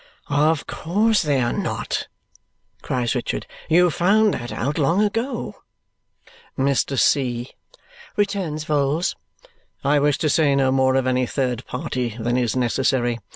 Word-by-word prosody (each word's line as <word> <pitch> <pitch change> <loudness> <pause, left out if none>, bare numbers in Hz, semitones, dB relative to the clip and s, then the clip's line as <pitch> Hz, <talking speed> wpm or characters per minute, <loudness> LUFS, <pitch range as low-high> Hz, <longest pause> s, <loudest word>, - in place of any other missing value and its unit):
"Of 150 +2 +2
course 210 +6 +1
they 145 -4 +1
are 120 0 0
not!" - - -3 0.7
cries 125 -2 -1
Richard. 125 -3 -3 0.2
"You 175 +2 +5
found 205 +6 +3
that 120 -1 -5
out 145 +6 -2
long 170 +8 +3
ago." 230 +4 -3 1.0
"Mr. 135 0 +1
C.," 125 -2 +1 0.6
returns 190 -7 -1
Vholes, 150 +3 +1 0.7
"I 145 +1 +3
wish 145 0 +2
to 155 - 0
say 150 -4 +3
no 135 -1 +2
more 130 0 +3
of 135 -1 +1
any 130 -1 +1
third 125 -3 -2
party 125 -3 -3
than 120 +2 0
is 125 -2 0
necessary. 125 -1 +1
140 Hz, 135 wpm, -22 LUFS, 125-165 Hz, 1.0 s, You